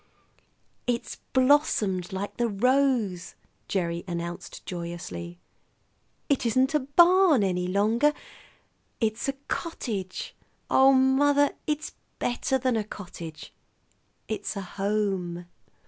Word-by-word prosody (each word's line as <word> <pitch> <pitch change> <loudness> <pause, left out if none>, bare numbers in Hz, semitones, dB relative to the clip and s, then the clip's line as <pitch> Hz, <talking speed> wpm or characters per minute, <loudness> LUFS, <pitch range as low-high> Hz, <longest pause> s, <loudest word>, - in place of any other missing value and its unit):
"It's 240 -1 -2
blossomed 255 - +2
like 190 +2 -4
the 240 0 +1
rose!" 225 -6 +1 0.3
Gerry 170 -3 -1
announced 170 0 -6
joyously. 170 - -6 0.9
"It 280 -3 +1
isn't 255 +4 +2
a 300 - +4
barn 340 - +5
any 180 -2 0
longer; 220 +9 +3 0.9
it's 220 +1 -1
a - - 0
cottage. 215 - -4 0.4
Oh, 265 +1 +7
mother, 280 +2 +4 0.2
it's 300 0 -2 0.2
better 245 +2 0
than 255 -1 0
a 215 - 0
cottage; 175 -6 -9 0.7
it's 220 0 -3
a 200 - -3
home." 195 -3 -2
215 Hz, 100 wpm, -27 LUFS, 180-265 Hz, 0.9 s, Oh